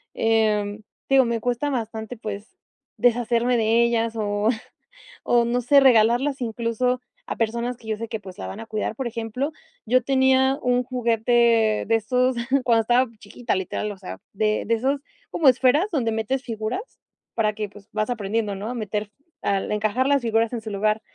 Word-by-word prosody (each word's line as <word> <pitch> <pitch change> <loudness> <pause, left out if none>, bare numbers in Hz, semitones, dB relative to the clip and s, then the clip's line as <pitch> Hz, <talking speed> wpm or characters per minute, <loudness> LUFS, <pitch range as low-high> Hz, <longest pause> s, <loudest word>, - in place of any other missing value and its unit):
em, 215 -2 +1 0.3
te - - -1
digo, 265 - +6
me 230 -1 -1
cuesta 245 +5 -1
bastante, 225 -2 -4
pues, 210 0 -7 0.4
deshacerme 240 0 +2
de 230 +1 +3
ellas 230 -1 0
o 205 +1 0 0.7
o 240 -1 +3
no 245 +1 0
sé 280 +4 +5
regalarlas 250 +3 +4
incluso 235 +2 -1 0.3
a - - -1
personas 235 +2 -1
que 225 - -16
yo 215 - -1
sé 230 +1 -5
que, 220 - -4
pues, 185 -1 -11
la - - -5
van 210 - -7
a 225 - -7
cuidar. 215 0 -3
Por 265 - -4
ejemplo, 230 +5 -3 0.3
yo 255 +3 +3
tenía 265 0 +3
un 250 0 +2
juguete 235 -2 +2
de 225 - +3
esos 250 +3 +1 0.3
cuando 230 -2 +3
estaba 245 +3 +3
chiquita, 230 +3 -4
literal, 190 +3 -3
o 200 - -9
sea, 185 -1 -8 0.2
de 215 +1 0
de 230 - +1
esos 270 +5 0 0.3
como 320 - +1
esferas 265 - +3
donde 245 -9 0
metes 225 +4 -1
figuras 225 - -3 0.5
para 215 -2 +1
que, 210 -1 -4
pues, 205 +1 -16
vas 215 +2 -1
aprendiendo 210 -2 -2
¿no? 200 +3 -6
A 250 - -3
meter 210 -2 -2
fi 210 +8 -42 0.2
al 195 0 0
encajar 215 +5 +1
las 280 -1 +3
figuras 225 +1 +1
en 235 - -3
su 220 -1 -7
lugar. 215 +2 0
230 Hz, 185 wpm, -23 LUFS, 215-250 Hz, 0.7 s, digo